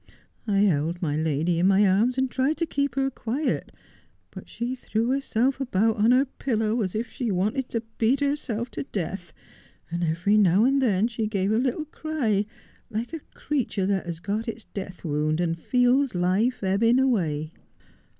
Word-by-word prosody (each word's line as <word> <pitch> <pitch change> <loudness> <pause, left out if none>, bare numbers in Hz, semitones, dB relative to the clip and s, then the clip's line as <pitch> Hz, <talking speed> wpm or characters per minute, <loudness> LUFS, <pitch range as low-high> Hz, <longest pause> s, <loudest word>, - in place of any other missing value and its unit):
I 200 -1 +2
held 170 -3 +1
my 150 -5 -1
lady 160 +2 0
in 180 - +4
my 195 +1 +5
arms 220 +7 +2
and 265 0 +2
tried 265 +5 0
to 335 - 0
keep 280 -4 -1
her 270 0 +1
quiet, 260 +5 -2 0.6
but - - -10
she 240 +2 -3
threw 235 -2 -2
herself 270 -1 0
about 225 -3 +1
on 215 +2 +3
her 255 +3 +5
pillow 225 -4 -1
as 190 -2 -2
if 230 +2 -1
she 245 -2 -4
wanted 215 +8 0
to 230 -1 -2 0.2
beat 235 +5 +3
herself 275 -5 -2
to - - -4
death, 180 - -5 0.6
and 170 +1 -2
every 170 +6 +2
now 200 +1 +5
and 275 +1 +3
then 215 -4 +2
she 225 -2 -2
gave 200 -2 0
a 220 - +3
little 260 +5 -1
cry 270 -10 -1 0.4
like 230 +7 -4
a 325 - -3 0.2
creature 245 -9 -1
that 190 -2 0
has 170 -1 -4
got 210 +6 -3
its 225 -1 -5
death 185 -2 -7
wound, 155 +1 0
and 165 -1 -1
feels 250 - +2
life 195 +8 +1
ebbing 220 +6 +3
away. 165 - 0
220 Hz, 180 wpm, -25 LUFS, 185-255 Hz, 0.6 s, my